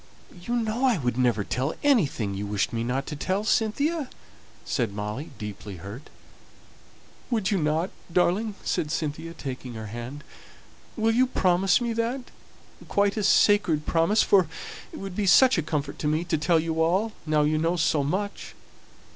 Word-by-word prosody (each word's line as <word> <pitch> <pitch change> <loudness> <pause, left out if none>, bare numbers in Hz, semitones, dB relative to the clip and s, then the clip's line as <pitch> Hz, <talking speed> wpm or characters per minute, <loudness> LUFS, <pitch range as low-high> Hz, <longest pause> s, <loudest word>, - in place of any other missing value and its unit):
"You 235 +7 -2
know 230 +1 -1
I 245 -5 +3
would 125 -6 -1
never 120 -5 +2
tell 130 +9 -2
anything 155 - +2
you 100 +1 -4
wished 100 +2 -1
me 115 0 -1
not 130 +3 -1
to 150 - -5
tell, 185 +9 -1
Cynthia," 275 +8 0 0.6
said 115 -6 -1
Molly, 105 +8 -4
deeply 105 -1 -7
hurt. 100 - -9 1.2
"Would 220 -6 0
you 200 - +2
not, 155 +4 0 0.2
darling?" 190 +5 +1
said 150 - -1
Cynthia, 155 +2 -3
taking 130 -3 -6
her 110 -1 -6
hand. 120 +7 -7 0.7
"Will 225 0 +2
you 255 +2 +4
promise 190 -3 +3
me 235 -1 -1
that? 235 +3 -2 0.6
quite 200 0 +2
a 215 - -1
sacred 195 -7 +4
promise? 170 +6 +3
for 190 -4 +4 0.4
it - - -8
would 195 -2 -6
be 205 -1 0
such 255 +2 +6
a - - +2
comfort 145 -2 -3
to 150 - -1
me 155 +2 +1
to 170 -2 0
tell 165 +2 +3
you 160 0 -1
all, 190 +7 +2 0.2
now 155 -1 +3
you 155 +1 +1
know 165 +2 +1
so 160 -3 +2
much." 200 +8 -3
165 Hz, 170 wpm, -26 LUFS, 135-210 Hz, 1.2 s, such